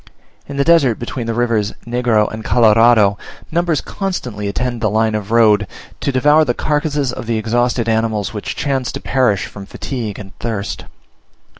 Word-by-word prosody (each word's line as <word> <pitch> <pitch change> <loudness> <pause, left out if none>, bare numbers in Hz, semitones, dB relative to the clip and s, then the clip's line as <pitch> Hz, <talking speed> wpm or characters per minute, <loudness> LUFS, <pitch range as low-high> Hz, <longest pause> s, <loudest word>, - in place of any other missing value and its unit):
In 140 - -7
the 140 - +3
desert 145 -8 +4
between 120 0 -5
the 115 - -2
rivers 115 -3 0
Negro 120 -3 +1
and 110 0 -6
Colorado, 110 -3 +4 0.3
numbers 170 -2 +1
constantly 130 - -4
attend 120 +3 -2
the 110 - +2
line 110 +1 +1
of 105 -1 -3
road 105 -3 +4 0.3
to - - -1
devour 150 +4 +4
the 120 -5 -1
carcasses 150 -3 -1
of - - -7
the 115 -1 0
exhausted 120 +1 0
animals 110 -2 0
which 105 - -5
chance 135 -3 -1
to - - -4
perish 125 -8 +1
from 100 -1 -10
fatigue 115 -7 -5
and 100 -1 -10
thirst. 105 -3 -4
115 Hz, 165 wpm, -17 LUFS, 110-130 Hz, 0.3 s, desert